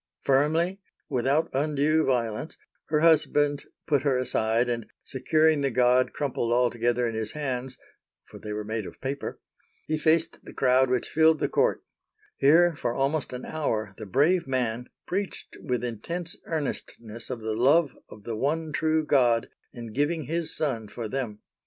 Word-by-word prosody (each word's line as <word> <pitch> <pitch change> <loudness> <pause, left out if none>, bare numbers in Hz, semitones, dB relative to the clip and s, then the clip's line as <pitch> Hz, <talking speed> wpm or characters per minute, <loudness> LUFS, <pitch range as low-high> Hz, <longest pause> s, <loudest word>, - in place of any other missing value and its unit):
Firmly, 160 +7 +2 0.3
without 135 +4 +1
undue 150 +2 +2
violence, 120 +2 -1 0.3
her 150 -1 0
husband 150 -3 +3 0.2
put 145 -4 +2
her 135 -3 +1
aside, 120 -1 +1
and, 120 -2 -3 0.2
securing 155 +3 +2
the 140 - +1
god 125 +1 +3
crumpled 130 -5 -2
all 120 0 +3
together 120 +1 0
in 115 - -3
his 110 -1 -3
hands, 130 -3 -4 0.5
(for - - -13
they 105 - -7
were 105 0 -3
made 110 -1 -4
of - - -12
paper), 135 +1 -4 0.5
he 155 0 -1
faced 160 +1 +1
the - - -11
crowd 130 0 +3
which 125 -1 0
filled 160 0 +4
the - - 0
court; - - +1 0.6
here, 165 +4 +5
for 120 -4 -2
almost 140 +1 0
an 125 0 -6
hour 110 -10 -2
the 105 - -7
brave 150 - +2
man 125 -2 -2 0.2
preached 195 +1 -4
with 125 -4 -2
intense 165 +9 -3
earnestness 120 -7 -5
of 125 -3 -5
the 110 0 -1
love 140 +5 +3
of 105 - -13
the 115 +1 -4
One 155 +6 -1
True 155 +1 +1
God 120 -6 +3 0.2
in 115 -2 -9
giving 150 +4 0
His 160 +3 -1
Son 120 -8 -2
for 115 +2 -6
them. 110 -4 -4
135 Hz, 165 wpm, -26 LUFS, 120-155 Hz, 0.6 s, here